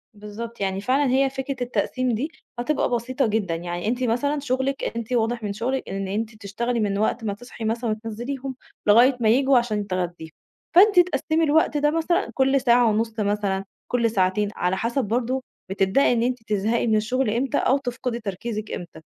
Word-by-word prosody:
بالضبط، 210 +3 -8
يعني 195 0 -1
فعلًا 265 +4 +2
هي 270 +1 +3
فكرة 270 +1 -4
التقسيم 250 +1 -1
دي 285 +9 -3 0.3
هتبقى 300 +5 0
بسيطة 250 +2 0
جدًا، 205 -6 0
يعني 175 +3 -4
أنتِ 245 +2 0
مثلًا 285 +5 0
شغلك 270 0 -1
أنتِ 235 +1 -4
واضح 235 0 0
من 205 -1 -2
شغلك 255 +6 -2
إن 195 0 -3
أنتِ 215 +3 -3
بتشتغلي 230 +4 -3
من 200 -2 0
وقت 225 +2 0
ما 205 - -1
تصحي 235 +1 -9
مثلًا 230 +1 -1
وتنزليهم 240 +5 -4 0.3
لغاية 245 +5 +6
ما 220 -2 +3
ييجوا 265 +3 +4
عشان 215 -4 0
تغديهم، 175 -3 -3 0.5
فأنتِ 390 +1 +7
تقسّمي 325 -1 +2
الوقت 305 0 +3
ده 295 0 +2
مثلًا 340 +4 0
كل 270 0 +2
ساعة 240 -2 +4
ونُص 225 +1 -1
مثلًا، 200 -2 0 0.3
كل 235 -2 +2
ساعتين، 195 +1 +1
على 180 +1 0
حسب 235 +5 -1
برضه، 250 +4 -1 0.3
بتبدئي 195 +7 +3
إن 235 -1 +1
أنتِ 250 -2 -1
تزهقي 215 +3 0
من 220 - +3
الشغل 245 +3 +1
إمتى 240 +4 0
أو 265 - +3
تفقدِي 250 -2 -4
تركيزِك 215 +1 -5
إمتى، 175 -2 -7
235 Hz, 180 wpm, -24 LUFS, 210-265 Hz, 0.5 s, فأنتِ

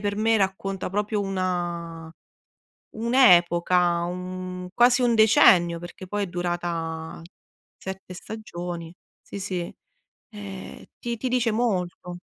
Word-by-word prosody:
per 205 0 -2
me 225 +1 +3
racconta 190 -1 -2
proprio 210 +1 -1
una 175 -4 -3 0.8
un'epoca, 180 -7 +4
un 180 0 -5
quasi 245 +1 +5
un 240 -1 +3
decennio, 175 -6 +5
perché 175 +2 -9
poi 205 +2 -2
è - - -5
durata 170 -2 -3 0.6
7 190 -1 -8
stagioni. 175 -5 -7 0.3
Sì, 200 - -8
sì, 180 -2 -3 0.6
ehm, 195 -2 -9
ti 235 -1 -3
ti 255 - -2
dice 245 -2 +1
molto. 180 -6 -2
185 Hz, 110 wpm, -25 LUFS, 175-210 Hz, 0.8 s, quasi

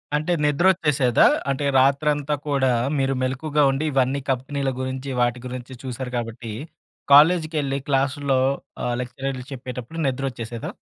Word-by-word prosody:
అంటే 155 +4 -1
ని‌ద్రొ‌చ్చేసేదా? 150 -5 +3 0.2
అంటే 135 +1 -1
రాత్రంతా 145 +2 +2
కూడా 135 -2 +2 0.3
మీరు 135 0 +1
మెలుకువగా 145 +3 0
ఉండి 140 +4 -2
ఇవన్నీ 135 +1 +1
కంపెనీల 135 +1 -2
గురించి 130 +1 -4
వాటి 120 0 +1
గురించి 125 +1 -7
చూసారు 125 0 -5
కాబట్టి, 115 -1 -5 0.6
కాలేజీకేళ్లి 155 -3 +4
క్లాసులో 135 0 +1 0.5
ఆ - - 0
లెక్చరర్లు 125 +1 -5
చెప్పేటప్పుడు 130 +3 -7
ని‌ద్రొ‌చ్చేసేదా? 125 -3 -4
135 Hz, 115 wpm, -23 LUFS, 125-145 Hz, 0.6 s, కాలేజీకేళ్లి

